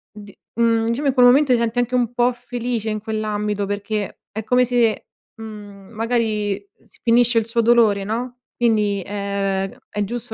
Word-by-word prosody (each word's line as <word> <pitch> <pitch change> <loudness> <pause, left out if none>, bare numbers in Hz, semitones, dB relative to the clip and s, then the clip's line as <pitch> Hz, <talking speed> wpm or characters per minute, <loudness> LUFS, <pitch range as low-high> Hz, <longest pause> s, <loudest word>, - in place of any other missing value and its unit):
di 205 -1 -12 0.2
mhmm, 230 -1 +2
diciamo, 270 +5 -1
in 270 - +2
quel 250 -2 +5
momento 265 +2 +5
ti 235 - +3
senti 235 +1 0
anche 245 +1 0
un 245 -1 0
po' 245 +1 +2
felice, 240 -2 -4
in 215 - -2
quell'ambito, 210 -2 -2
perché 205 +1 -4
è 220 +1 -5
come 250 +2 +3
se, 235 -3 +1 0.3
mhmm, 205 -3 -10
magari, 220 -3 -1 0.3
s - - -22
finisce 235 0 +3
il 220 - +2
suo 230 0 0
dolore, 225 -4 +4
no, 240 +4 -4 0.2
quindi, 210 -4 +1
è 200 -1 -2 0.2
è 210 0 -2
giusto 240 +2 -5
225 Hz, 175 wpm, -21 LUFS, 205-240 Hz, 0.3 s, quel